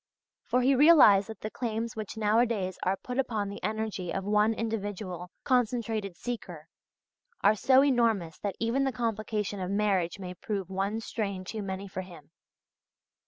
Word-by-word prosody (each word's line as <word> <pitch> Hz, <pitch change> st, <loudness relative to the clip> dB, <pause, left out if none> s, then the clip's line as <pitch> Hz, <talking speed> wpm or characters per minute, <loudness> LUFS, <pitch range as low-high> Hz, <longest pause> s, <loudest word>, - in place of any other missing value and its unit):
For 250 Hz, -, +2 dB
he 270 Hz, +2 st, +4 dB
realized 265 Hz, -9 st, +7 dB
that 220 Hz, -4 st, -8 dB
the 215 Hz, -, -4 dB
claims 230 Hz, -1 st, -3 dB
which 215 Hz, 0 st, -6 dB
nowadays 215 Hz, -3 st, +1 dB
are 190 Hz, +1 st, 0 dB
put 250 Hz, +1 st, -3 dB
upon 215 Hz, -6 st, -1 dB
the 200 Hz, -, -8 dB
energy 215 Hz, -3 st, -3 dB
of 195 Hz, -, -2 dB
one 210 Hz, +2 st, +3 dB
individual 205 Hz, -5 st, -4 dB
concentrated 225 Hz, -6 st, 0 dB
seeker, 180 Hz, -10 st, -6 dB, 0.7 s
are 205 Hz, -, +5 dB
so 260 Hz, +5 st, +5 dB
enormous 225 Hz, -, +1 dB
that 200 Hz, -3 st, -3 dB
even 230 Hz, +4 st, +1 dB
the 270 Hz, -, +1 dB
complication 215 Hz, -3 st, -2 dB
of 185 Hz, -1 st, -3 dB
marriage 195 Hz, -3 st, +1 dB
may 180 Hz, -2 st, -6 dB
prove 195 Hz, 0 st, -4 dB
one 200 Hz, +4 st, -1 dB
strain 200 Hz, -4 st, -3 dB
too 215 Hz, +4 st, -5 dB
many 195 Hz, 0 st, -5 dB
for 190 Hz, -1 st, -5 dB
him. 170 Hz, -5 st, -13 dB
210 Hz, 160 wpm, -29 LUFS, 190-230 Hz, 0.7 s, realized